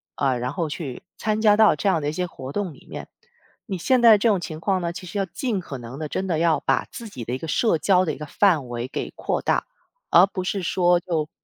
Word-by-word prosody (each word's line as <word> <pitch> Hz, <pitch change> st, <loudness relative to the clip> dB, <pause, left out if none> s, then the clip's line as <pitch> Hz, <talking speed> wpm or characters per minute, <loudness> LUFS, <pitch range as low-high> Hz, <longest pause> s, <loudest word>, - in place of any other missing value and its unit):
呃， 130 Hz, -3 st, 0 dB
然 125 Hz, +1 st, -2 dB
后 165 Hz, +3 st, -2 dB
去 145 Hz, -4 st, -6 dB, 0.2 s
参 215 Hz, 0 st, 0 dB
加 210 Hz, -2 st, +6 dB
到 215 Hz, 0 st, +5 dB
这 205 Hz, -, -2 dB
样 165 Hz, -5 st, +2 dB
的 145 Hz, -, -1 dB
一 -, -, -2 dB
些 180 Hz, +3 st, -2 dB
活 135 Hz, -6 st, -8 dB
动 190 Hz, -2 st, -3 dB
里 -, -, -19 dB
面。 -, -, -7 dB, 0.6 s
你 195 Hz, -4 st, -3 dB
现 250 Hz, +9 st, +2 dB
在 230 Hz, -2 st, +9 dB
的 -, -, +6 dB
这 205 Hz, -, +1 dB
种 200 Hz, -5 st, +2 dB
情 160 Hz, -2 st, -6 dB
况 190 Hz, +1 st, 0 dB
呢， 170 Hz, -1 st, -2 dB
其 185 Hz, +2 st, -8 dB
实 190 Hz, +3 st, -4 dB
要 195 Hz, -, +1 dB
尽 215 Hz, +3 st, -2 dB
可 145 Hz, -6 st, -7 dB
能 120 Hz, +4 st, -9 dB
地 155 Hz, -, -3 dB
真 190 Hz, -, -3 dB
的 170 Hz, -4 st, 0 dB
要 165 Hz, -2 st, +3 dB
把 -, -, +1 dB
自 230 Hz, -, -8 dB
己 125 Hz, -, -8 dB
的 120 Hz, -, -4 dB
一 -, -, -3 dB
个 165 Hz, -, -7 dB
社 215 Hz, +2 st, +2 dB
交 185 Hz, +2 st, +3 dB
的 160 Hz, -4 st, -1 dB
一 -, -, -13 dB
个 150 Hz, -, -6 dB
范 160 Hz, -4 st, +2 dB
围 120 Hz, +1 st, -4 dB
给 -, -, -5 dB
扩 -, -, -2 dB
大， -, -, +1 dB, 0.4 s
而 175 Hz, +2 st, +7 dB
不 190 Hz, -1 st, -5 dB
是 190 Hz, +1 st, -2 dB
说 175 Hz, 0 st, +3 dB
就， 160 Hz, -4 st, -2 dB
175 Hz, 295 characters per minute, -23 LUFS, 150-200 Hz, 0.6 s, 在